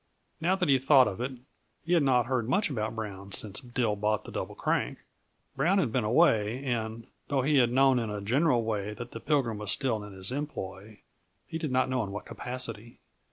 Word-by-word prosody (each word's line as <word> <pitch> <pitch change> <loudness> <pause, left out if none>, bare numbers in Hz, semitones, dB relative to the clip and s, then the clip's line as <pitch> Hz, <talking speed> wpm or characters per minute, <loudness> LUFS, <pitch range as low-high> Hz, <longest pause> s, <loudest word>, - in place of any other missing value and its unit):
Now 180 +4 +2
that 185 -2 0
he 135 -2 +5
thought 135 -1 +6
of 100 +1 -4
it, 130 +2 -2 0.5
he 170 - +1
had 170 - +5
not 125 -4 +3
heard 120 -2 -1
much 200 +1 +1
about 110 -3 -2
Brown 100 -3 -6
since 100 +2 -2
Dill 120 -4 -1
bought 105 +1 0
the - - -10
Double - - -4
Crank. - - -1 0.6
Brown 165 +9 +2
had 145 - +1
been 125 0 +1
away, 115 -1 +3
and, 115 -2 -2 0.2
though 135 -3 +1
he 145 +2 +3
had 120 -2 +4
known 135 0 +4
in 115 -2 -2
a 105 0 -3
general 125 +4 +2
way 105 -2 -2
that 120 +1 -8
the 115 - -7
Pilgrim 120 -4 0
was 105 -1 -5
still 115 -4 0
in 105 -1 -9
his 95 +3 -3
employ, 110 -7 -6 0.4
he 160 -2 -5
did 155 -4 -3
not 130 0 +2
know 130 -2 0
in 100 - -5
what 105 - -6
capacity. 120 -2 -5
120 Hz, 210 wpm, -29 LUFS, 105-135 Hz, 0.6 s, thought